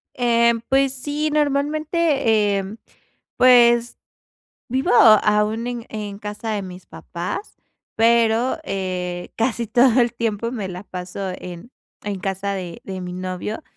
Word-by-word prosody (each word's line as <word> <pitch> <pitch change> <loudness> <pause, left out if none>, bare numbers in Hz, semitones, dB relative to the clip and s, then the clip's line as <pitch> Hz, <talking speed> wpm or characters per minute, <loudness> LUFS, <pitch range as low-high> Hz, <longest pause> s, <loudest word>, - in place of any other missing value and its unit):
Em, 235 -1 +2
pues, 270 +2 +1
sí, 295 +3 -2
normalmente, 290 - +1
em, 195 +3 -7 0.6
pues 240 -1 +5 0.7
vivo 260 +2 0
aún 215 0 +4
en 240 -2 -5
en 205 -2 -6
casa 210 +2 -6
de 205 -2 -2
mis 185 -1 -10
papás, 170 - -6 0.4
pero, 230 +2 +3
eh, 180 -3 -4
casi 230 0 -1
todo 245 +2 +4
el 240 0 +1
tiempo 230 -1 -2
me 210 -6 -4
la 180 +2 -8
paso 185 +1 -6
en 180 +6 -10 0.3
en 200 -2 -3
casa 195 +1 -2
de 180 -3 -6
de 190 -1 -6
mi 180 0 -6
novio, 185 - -5
220 Hz, 130 wpm, -21 LUFS, 190-245 Hz, 0.7 s, pues